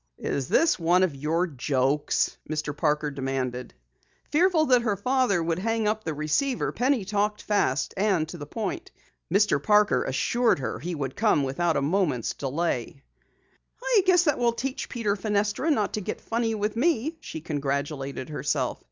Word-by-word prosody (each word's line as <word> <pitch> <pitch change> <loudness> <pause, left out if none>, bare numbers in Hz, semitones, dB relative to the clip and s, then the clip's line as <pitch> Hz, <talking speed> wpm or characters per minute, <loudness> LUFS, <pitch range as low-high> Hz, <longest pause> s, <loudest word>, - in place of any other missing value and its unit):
"Is 135 -3 -3
this 330 - +3
one 175 +2 +3
of 180 -5 +1
your 155 +6 0
jokes?" 140 -1 0
Mr. 155 -1 -3
Parker 150 -1 0
demanded. 130 - -3 0.6
Fearful 330 0 +3
that 250 -4 +4
her 220 -4 0
father 250 -5 +1
would 165 +1 -1
hang 225 +1 0
up 215 +1 -1
the 160 -2 -3
receiver, 155 - 0
Penny 250 -4 +1
talked 210 +1 -1
fast 135 -11 0
and 190 -5 +1
to 175 - -8
the 145 - -7
point. 210 +3 -4 0.4
Mr. 205 +3 +3
Parker 210 -1 +3
assured 235 - +1
her 130 -5 -4
he 170 +6 -4
would 135 -3 -4
come 210 -10 +2
without 160 +5 0
a - - 0
moment's 150 - 0
delay. 135 -2 -3 0.8
"I - - +3
guess 360 -2 +5
that 295 -6 +1
will 240 -1 +2
teach 260 +3 -4
Peter 215 -4 -1
Fenestra 210 +7 0
not 220 -10 +1
to 215 - -2
get - - -4
funny 230 -1 -1
with 210 +1 -2
me!" 310 +3 +1
she - - -7
congratulated 140 -2 -3
herself. 150 - -1
185 Hz, 165 wpm, -26 LUFS, 145-225 Hz, 0.8 s, guess